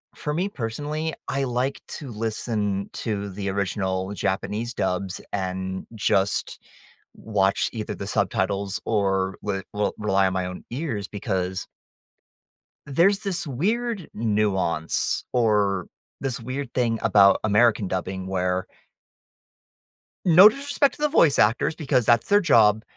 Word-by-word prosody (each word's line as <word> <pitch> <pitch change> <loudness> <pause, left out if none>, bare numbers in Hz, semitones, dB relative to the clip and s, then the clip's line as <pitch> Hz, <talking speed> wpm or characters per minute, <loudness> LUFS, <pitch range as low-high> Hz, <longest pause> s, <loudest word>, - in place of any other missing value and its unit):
for 150 - -4
me, 180 +5 0
personally, 150 - -3 0.2
I 135 0 -1
like 125 +1 -1 0.2
to 140 -5 -8
listen 105 -2 -2
to 100 -3 -3
the 100 +1 -4
original 95 -1 -2
Japanese 105 +4 -2
dubs 95 -2 -2
and 95 -1 -3
just 100 -1 0 0.6
watch 100 -3 0
either 110 -2 -4
the 100 - -6
subtitles 100 -1 -1
or 95 -3 0
re 95 -2 -3
r 105 0 0
rely 100 -2 +2
on 95 - -2
my 95 -1 -1
own 90 0 -7
ears 120 -7 -3
because 95 -2 -3 1.2
there's 175 +8 +3
this 195 -6 -2
weird 205 - -1
nuance, 105 -7 0
or 105 -6 +2 0.3
this 135 -1 -2
weird 130 +2 -5
thing 115 -3 +1
about 100 -3 +5
American 110 -1 +3
dubbing 95 0 -3
where 90 -1 -1 1.6
no 180 +3 +9
disrespect 280 +2 0
to - - -14
the 300 - +2
voice 165 - +4
actors 115 +8 +2
because 135 -6 +1
that's 120 0 +3
their 205 0 +6
job, 110 - +4
105 Hz, 130 wpm, -24 LUFS, 95-135 Hz, 1.6 s, no